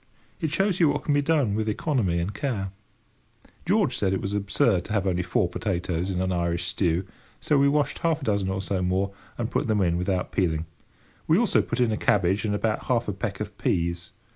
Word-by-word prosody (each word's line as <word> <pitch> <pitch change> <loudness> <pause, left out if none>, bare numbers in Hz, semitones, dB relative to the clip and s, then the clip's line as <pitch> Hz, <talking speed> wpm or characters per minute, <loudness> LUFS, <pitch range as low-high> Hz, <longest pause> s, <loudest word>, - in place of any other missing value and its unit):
It 160 - -1
shows 195 +3 +1
you 165 -4 +5
what 145 +1 -1
can 150 - +1
be 145 - +3
done 145 -8 +2
with 110 +1 0
economy 105 - 0
and 85 +4 -2
care. 105 -5 -2 1.0
George - - +2
said 95 -2 0
it 95 - 0
was 100 0 -3
absurd 100 -1 +1
to - - -5
have 100 -3 +1
only 90 -2 +1
four 90 - +1
potatoes 90 -2 -2
in 90 -2 -1
an 95 0 0
Irish 85 -1 -1
stew, 90 0 0 0.3
so 145 - +2
we 140 0 +5
washed 145 0 0
half 160 -3 0
a - - -4
dozen 100 -3 +1
or 95 0 -2
so 95 -1 -1
more, 95 +2 0 0.3
and 120 0 -3
put - - 0
them 110 -2 +2
in 85 -2 +2
without 90 0 -1
peeling. 80 -4 0 0.6
We - - +5
also - - +3
put - - -4
in 120 -3 +3
a 110 - 0
cabbage 100 +1 +2
and 105 -1 0
about 110 +1 -1
half 120 -2 +1
a 105 - -1
peck 100 0 -4
of 105 -1 -5
peas. 85 -1 -1
100 Hz, 220 wpm, -26 LUFS, 90-120 Hz, 1.0 s, you